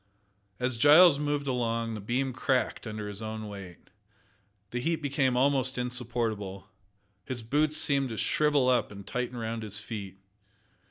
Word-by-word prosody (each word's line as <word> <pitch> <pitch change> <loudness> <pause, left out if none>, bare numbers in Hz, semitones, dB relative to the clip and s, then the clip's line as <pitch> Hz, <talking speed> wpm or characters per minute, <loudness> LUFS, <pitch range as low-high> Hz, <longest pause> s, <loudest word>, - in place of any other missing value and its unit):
As 125 -1 -1
Giles 150 +4 +7
moved 145 -1 -1
along, 115 -3 -1
the 110 - -5
beam 130 +5 -1
cracked 130 -1 0
under 105 -1 -5
his 100 -1 -6
great 110 0 -5
weight. 100 -4 -9 0.8
The 120 - -2
heat 165 +6 +1
became 140 -4 0
almost 130 -1 +2
insupportable. 115 -6 -3 0.6
His 120 +1 -5
boots 150 +6 +1
seemed 140 -3 +1
to 110 - -5
shrivel 145 -1 +2
up 125 -4 +2
and 100 -1 -10
tighten 125 0 -3
round 115 0 -3
his 105 -1 -5
feet. 100 -3 -7
125 Hz, 150 wpm, -29 LUFS, 110-135 Hz, 0.8 s, Giles